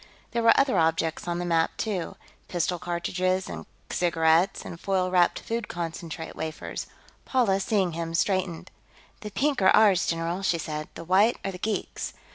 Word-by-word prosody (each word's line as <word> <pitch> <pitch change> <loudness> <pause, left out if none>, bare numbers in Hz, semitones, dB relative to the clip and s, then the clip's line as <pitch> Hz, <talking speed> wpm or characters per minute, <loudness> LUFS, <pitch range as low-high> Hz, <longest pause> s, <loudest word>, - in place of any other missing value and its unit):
There 235 - 0
were 230 0 +6
other 265 -9 +3
objects 160 +1 0
on 175 0 -1
the 175 - -2
map, 165 -1 +1
too 200 -6 -2 0.3
pistol 175 0 -1
cartridges, 180 +2 -1
and - - -7 0.2
cigarettes, 170 +1 +2
and 170 - -8
foil 185 -1 0
wrapped 175 -1 +3
food 230 -1 -3
concentrate 165 -1 -5
wafers. 160 0 -5 0.4
Paula, 230 -7 +2
seeing 195 -2 +1
him, 165 0 -4
straightened. 185 -2 0 0.5
"The 210 - -6
pink 275 +3 0
are 190 - +6
ours, 200 -5 +5
general," 165 +2 -1
she 185 -3 +1
said. 155 -1 -4
"The - - -7
white 195 +7 +4
are 195 - -1
the 180 - -9
geeks." 215 +2 -3
180 Hz, 165 wpm, -26 LUFS, 165-195 Hz, 0.5 s, were